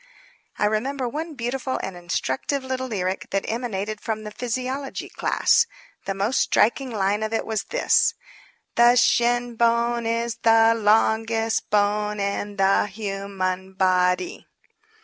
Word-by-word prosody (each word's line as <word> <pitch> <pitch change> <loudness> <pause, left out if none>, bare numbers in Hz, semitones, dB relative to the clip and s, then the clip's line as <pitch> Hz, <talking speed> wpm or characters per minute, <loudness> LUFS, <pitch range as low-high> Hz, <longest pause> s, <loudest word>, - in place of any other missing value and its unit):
I - - +1
remember 250 +5 -1
one 310 +5 -5
beautiful 260 +2 -3
and 190 - -5
instructive 175 - -2
little 260 0 -3
lyric 190 -5 -3
that 195 - -1
emanated 215 -3 -3
from 220 -1 -3
the 210 - -7
physiology 255 +4 -4
class. 470 - +2 0.4
The 195 - -2
most 205 +6 0
striking 255 +4 +2
line 205 -2 0
of 220 +1 -2
it 225 - -1
was 220 -2 -2
this: 460 -2 +2 0.6
"The 240 +1 +5
shin 240 0 +2
bone 235 0 +2
is 230 0 -1
the 225 0 +5
long 220 +1 +2
est 225 0 -1
bone 210 0 +1
in 200 +1 -2
the 195 +1 +3
hu 200 -1 -5
man 190 -1 -3
bod 185 -1 +2
y." 180 - -8
220 Hz, 145 wpm, -23 LUFS, 200-240 Hz, 0.6 s, The